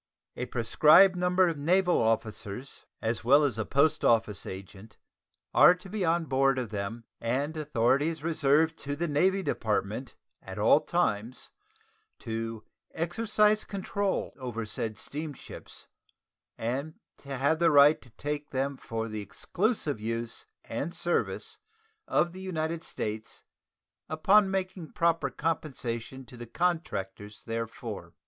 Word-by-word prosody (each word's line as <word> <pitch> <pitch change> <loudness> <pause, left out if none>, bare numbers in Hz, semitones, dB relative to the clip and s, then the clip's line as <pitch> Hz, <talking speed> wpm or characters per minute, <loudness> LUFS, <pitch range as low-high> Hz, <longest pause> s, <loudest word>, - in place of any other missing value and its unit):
A 125 - -4
prescribed 155 - +5
number 180 +1 +3
of 165 -4 -2
naval 180 +3 +3
officers, 110 +2 -3 0.2
as 115 +1 -1
well 140 +5 +6
as 125 -7 0
a 110 - -1
post 140 +2 +2
office 110 -4 +2
agent, 95 +3 -10 0.6
are 180 - +8
to 185 +2 -13
be 210 0 -2
on 165 0 +2
board 135 -1 +2
of 125 -4 -2
them, 105 +3 -4 0.2
and 135 +7 -1
authority 140 -1 +1
is 160 -2 -4
reserved 160 0 +2
to 145 +1 -3
the 170 +3 -2
Navy 190 +6 +2
Department 110 - -2 0.3
at - - -9
all - - +5
times 105 +4 -2 0.7
to 115 -1 -5 0.3
"exercise 210 +5 +2
control 200 0 -2
over 120 -3 -4
said 110 0 -3
steamships" 150 -1 -8 0.7
and 135 +7 -3 0.2
"to 140 -1 -6
have 145 +5 +2
the 170 -1 +5
right 145 0 +6
to 125 - -17
take 145 +5 -5
them 135 +1 -2
for 115 -2 -4
the 110 -1 -5
exclusive 170 - -1
use 115 +1 -4 0.2
and 170 +4 -4
service 440 - -2 0.5
of 175 - +2
the 185 - -8
United 165 -3 -3
States 110 +1 -5 0.7
upon 190 +6 +4
making 190 -3 -3
proper 170 -1 +1
compensation 130 -5 -3
to 125 - -13
the 120 0 -8
contractors 105 - -2
therefor." 115 0 -5
140 Hz, 135 wpm, -29 LUFS, 115-170 Hz, 0.7 s, are